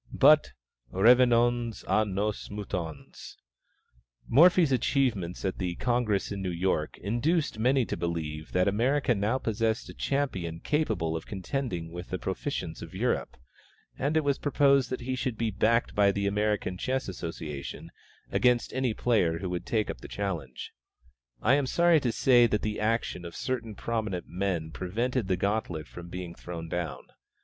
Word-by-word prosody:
But - - +5 0.4
revenons 120 +1 +4
à 110 - +2
nos 105 +2 -2
moutons. 90 -7 -6 0.9
Morphy's 170 +2 +6
achievements 120 -10 0
at 95 - -2
the 90 -2 -2
Congress 120 -5 0
in 100 -1 -4
New 95 - -2
York 85 -3 -1
induced 120 - 0
many 130 +2 +3
to - - -3
believe 80 -3 -4
that 90 +1 +2
America 125 +6 +2
now 105 +4 0
possessed 110 -2 -1
a - - -8
champion 95 -13 -2
capable 110 - 0
of 80 - -5
contending 95 -5 -3
with 90 +1 -7
the - - -2
proficients - - -4
of - - -9
Europe, - - -1 0.6
and 145 +4 0
it 160 - +2
was 140 -1 +1
proposed 140 -2 +3
that 130 - -3
he 130 +2 -2
should 125 -2 -2
be 115 -1 0
backed 115 +2 +2
by 100 -1 +4
the 100 0 -2
American 105 -2 0
Chess 130 +1 -1
Association 80 -6 -6 0.4
against 125 -1 +2
any 130 -4 0
player 90 -9 +2
who 90 +1 -4
would 90 -1 -4
take 110 -2 0
up - - -11
the - - -8
challenge. 85 -11 -4 0.7
I 120 - +5
am 140 -1 +2
sorry 170 +2 +4
to 125 -4 0
say 120 0 +5
that 105 -2 -1
the 105 -1 -2
action 110 -4 -1
of 85 -1 -8
certain 120 -4 -3
prominent 110 -5 -3
men 90 -4 -2
prevented 115 - -2
the 95 -2 +1
gauntlet 95 -6 -1 0.2
being 90 -1 -6
thrown 85 -2 -7
down. 85 -1 -3
105 Hz, 155 wpm, -28 LUFS, 90-125 Hz, 0.9 s, Morphy's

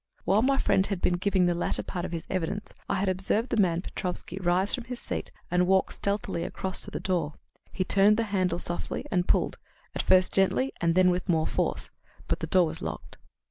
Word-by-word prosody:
While 200 +4 +3
my 270 +2 +2
friend 190 -6 +2
had 200 -3 -2
been 175 0 +1
giving 190 0 +2
the 175 - +2
latter 170 - -1
part 175 -1 -4
of - - -6
his 165 -2 -5
evidence, 190 +3 -3 0.2
I - - +1
had 195 +1 0
observed 190 +5 +1
the - - -1
man 175 -4 +2
Petrofsky 180 +1 -3
rise 185 +2 +2
from 250 -3 -2
his 250 0 -6
seat - - -4 0.2
and 180 0 +2
walk 190 0 +3
stealthily 200 -4 -2
across 190 -1 -2
to - - +2
the - - -5
door. 165 -5 -1 0.4
He 185 - -1
turned 200 +3 +4
the 230 - +1
handle 180 -3 +1
softly 175 0 -2
and 180 -1 +1
pulled, - - +1 0.3
at - - -1
first 185 -1 +4
gently, 195 +7 +2
and 170 -1 +2
then 185 0 +5
with 180 +2 -3
more 160 -2 +2
force. - - -2 0.4
But - - -1
the - - -4
door 185 -2 +4
was 160 0 -5
locked. 75 -3 -7
185 Hz, 220 wpm, -27 LUFS, 175-200 Hz, 0.4 s, then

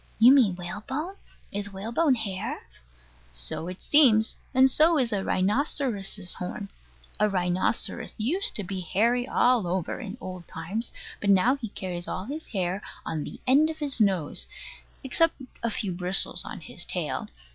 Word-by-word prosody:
You 240 +4 +8
mean 230 -10 +4
whalebone? 215 - -5 0.4
Is 200 0 -2
whalebone 235 +9 +1
hair? 200 -5 -4 0.7
So - - -2
it 180 +1 -7
seems. 235 -8 +5 0.2
And 260 +1 +6
so 315 +5 +4
is 245 -5 +1
a 195 -2 0
rhinoceros's 205 - 0
horn. 195 +2 -5 0.5
A 210 0 +3
rhinoceros 185 +4 -1
used 325 - +1
to 205 - -2
be 190 +1 -4
hairy 230 +8 +1
all 245 -8 +3
over 180 -1 -2
in 215 0 -7
old 185 -6 -8
times: 195 +9 0 0.3
but 200 - -1
now 200 +7 +5
he 255 -5 -6
carries 180 -3 -5
all 185 - -4
his 300 +6 -6
hair 190 -2 -2 0.2
on 155 -2 -2
the - - -8
end 285 +5 +5
of 320 - -5
his 285 -6 -1
nose, 190 -7 +1 0.6
except 320 +5 +2 0.3
a 235 - 0
few 205 -3 -2
bristles 180 +2 +1
on - - -8
his - - -3
tail. - - -3
210 Hz, 155 wpm, -27 LUFS, 185-255 Hz, 0.7 s, You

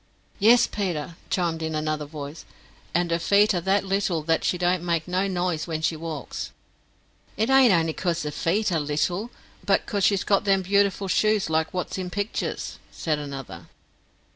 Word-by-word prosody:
"Yes, 230 +4 +6
Peter," 170 -6 -3
chimed 170 -3 0
in 160 -1 -2
another 155 -1 -1
voice; 145 +1 -8 0.5
"and 175 0 0
her 170 - +1
feet 205 +4 +4
are 175 - 0
that 195 +3 +1
little 190 -4 0
that 165 +1 +1
she 180 - +1
don't 180 0 +1
make 170 -2 -1
no 185 +2 0
nise 180 -4 -1
wen 160 -1 -3
she 160 +1 +1
walks." 155 -3 -5 0.9
"It 220 +5 +1
ain't 265 -3 +7
only 165 -3 +2
becos 175 -1 -1
her 150 - -3
feet 190 +7 0
are 165 - +1
little, 165 +9 -1 0.3
but - - +2
cos 200 -2 -2
she's 195 0 +3
got 200 -1 +2
them 195 -1 +2
beautiful 200 +1 +2
shoes 210 0 +2
like 160 0 +1
wot's 185 +1 -3
in 180 -1 -4
picters," 205 +3 -3
said 155 -2 -2
another. 135 - -7
175 Hz, 175 wpm, -25 LUFS, 160-195 Hz, 0.9 s, ain't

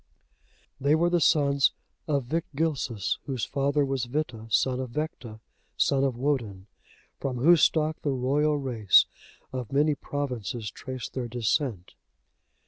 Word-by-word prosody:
They 140 +3 +3
were 170 +2 +2
the 175 -1 +2
sons 140 -3 +3 0.3
of 140 -3 +1
Victgilsus, 145 - -2
whose 130 -5 -2
father 140 +1 +1
was 135 -2 -1
Vitta, 120 -4 -3
son 125 +3 +2
of 130 -1 -4
Vecta, 120 -6 -5 0.4
son 135 -1 +2
of 130 -3 0
Woden; 120 -9 -2 0.5
from 130 -2 -3
whose 160 +5 +5
stock 155 0 +2
the 145 - -1
royal 140 +3 +1
race 120 -8 +4 0.5
of 125 -4 -5
many 150 +2 +3
provinces 125 -7 -4
trace 130 +1 -6
their 125 -2 -4
descent. 115 - -1
135 Hz, 135 wpm, -27 LUFS, 120-150 Hz, 0.5 s, whose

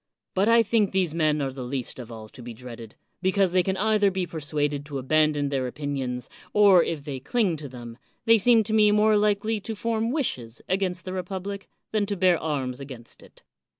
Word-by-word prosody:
But 195 +4 +2
I 230 0 +6
think 215 -2 +1
these 185 -5 +1
men 155 -3 +1
are 135 - -2
the 135 - -7
least 130 0 -4
of 120 -1 -8
all 110 -1 -9
to 125 - -13
be 120 -1 -8
dreaded, 115 -2 -10 0.3
because 190 0 +2
they 185 0 +4
can 190 +2 -1
either 210 0 +3
be 190 -1 -2
persuaded 145 -3 -2
to 145 -2 -5
abandon 150 +1 +2
their 135 -2 -1
opinions, 130 -2 -4 0.3
or 200 -4 +6
if 155 -4 -4
they 140 -3 -5
cling 190 - 0
to 145 -2 -7
them, 120 -1 -10 0.3
they 230 0 +6
seem 230 +1 +5
to 215 +1 -4
me 215 -1 +5
more 210 +1 +4
likely 210 +1 +1
to 220 +2 -6
form 225 +1 -1
wishes 125 - -3
against 185 -2 -1
the 185 - -5
republic 190 +2 -5 0.2
than 210 -2 0
to 205 -1 -2
bear 180 -2 +3
arms 135 -5 -2
against 130 -4 -10
it. - - -18
170 Hz, 205 wpm, -25 LUFS, 135-205 Hz, 0.3 s, I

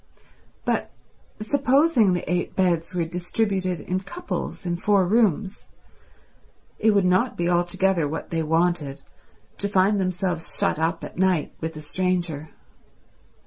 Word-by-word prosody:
But - - 0 0.5
supposing 270 - +3
the 180 0 -3
eight 180 0 -1
beds 180 -2 +1
were 170 -2 0
distributed 185 +1 -1
in 180 +4 -2
couples 200 - -5
in 175 -1 -1
four 195 +1 +3
rooms, 205 -1 +1 1.1
it 220 - +3
would 200 -2 +3
not 185 +8 +2
be 170 - 0
altogether 175 -1 +1
what 160 +3 -5
they 165 -1 0
wanted, 160 -3 0 0.6
to 200 - -1
find 195 +1 +3
themselves 180 -2 -1
shut - - +1
up 160 +1 -1
at - - -8
night 185 -5 +1
with 160 0 -4
a 155 - -7
stranger. 170 -2 -1
180 Hz, 135 wpm, -24 LUFS, 170-195 Hz, 1.1 s, supposing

